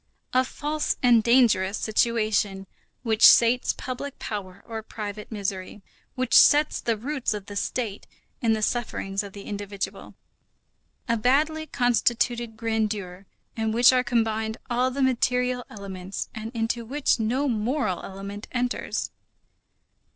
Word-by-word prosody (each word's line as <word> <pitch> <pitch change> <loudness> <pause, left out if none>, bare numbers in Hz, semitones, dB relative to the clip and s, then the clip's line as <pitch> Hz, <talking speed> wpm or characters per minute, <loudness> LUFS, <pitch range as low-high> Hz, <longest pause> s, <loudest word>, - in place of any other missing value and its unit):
A 255 0 +4
false 300 +3 -2
and 240 -2 +6
dangerous 220 -5 +3
situation, 215 -3 0 0.4
which 225 -2 -1
sates 240 +1 +7
public 255 +2 -6
power 195 -2 -6
or 225 -1 -5
private 210 -1 -7
misery, 195 -1 -4 0.3
which 255 -2 -2
sets 300 +1 +6
the 230 -2 0
roots 260 -1 -2
of 205 -2 -7
the 205 - -9
State 210 0 -3 0.3
in 230 -2 +3
the 215 -1 -1
sufferings 205 -4 -1
of 200 -2 -9
the 200 - -9
individual. 205 -1 -6 0.9
A 230 -1 +1
badly 310 +7 +1
constituted 240 -2 +1
grandeur 210 -5 -2 0.3
in 220 -1 -1
which 240 +3 +6
are 250 -1 +3
combined 220 -2 0
all 250 +2 +2
the 270 +1 -1
material 250 -1 +1
elements 195 -2 -6
and 220 0 -6
into 230 +1 -1
which 265 +2 0
no 250 +6 0
moral 225 - -1
element 200 +2 -8
enters. 245 0 -2
225 Hz, 130 wpm, -25 LUFS, 205-250 Hz, 0.9 s, sates